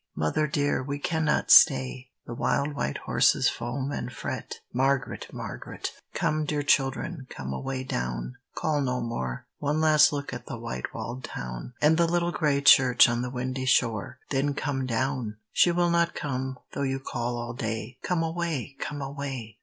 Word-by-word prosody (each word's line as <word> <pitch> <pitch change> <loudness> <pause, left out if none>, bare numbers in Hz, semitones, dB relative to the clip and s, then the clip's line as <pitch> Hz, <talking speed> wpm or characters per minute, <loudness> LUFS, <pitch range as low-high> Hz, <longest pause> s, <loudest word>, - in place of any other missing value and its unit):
"Mother 75 - +1
dear, 145 -1 +1
we 140 +2 -3
cannot 160 -1 0
stay! 130 -2 +6 0.2
The 120 - -6
wild 140 +4 0
white 145 - -2
horses - - +4
foam 130 +4 -3
and - - -4
fret." - - -5 0.2
Margaret! 135 0 0
Margaret! - - -6 0.2
Come, 155 0 +1
dear 150 -1 -1
children, 135 +2 +1
come 65 -1 -5
away 130 - -3
down; 60 - -3 0.2
Call 150 -2 0
no 125 -2 0
more! 65 - -4
One 150 +2 0
last 155 -1 +6
look 145 -2 -4
at 120 0 -7
the - - -5
white 90 - -5
walled 125 +2 -6
town, - - -5
RAINBOW 60 - -7
GOLD - - -5
And 155 +2 +5
the 170 -1 +4
little 175 0 +1
gray 145 -4 +1
church 130 -3 +7
on 120 0 0
the 125 - -3
windy 130 +1 -3
shore; 115 -5 +1
Then 140 +1 +1
come 135 -2 -2
down! 125 -2 -1
She 175 - +4
will 175 0 +2
not 170 0 +2
come, 130 -2 -3
though - - -4
you 135 -1 0
call 120 -2 -3
all 120 0 -4
day; 115 +1 -4
Come 175 -2 0
away, 160 -5 -3
come 145 -2 -4
away! 135 -6 -6
135 Hz, 175 wpm, -27 LUFS, 120-145 Hz, 0.2 s, church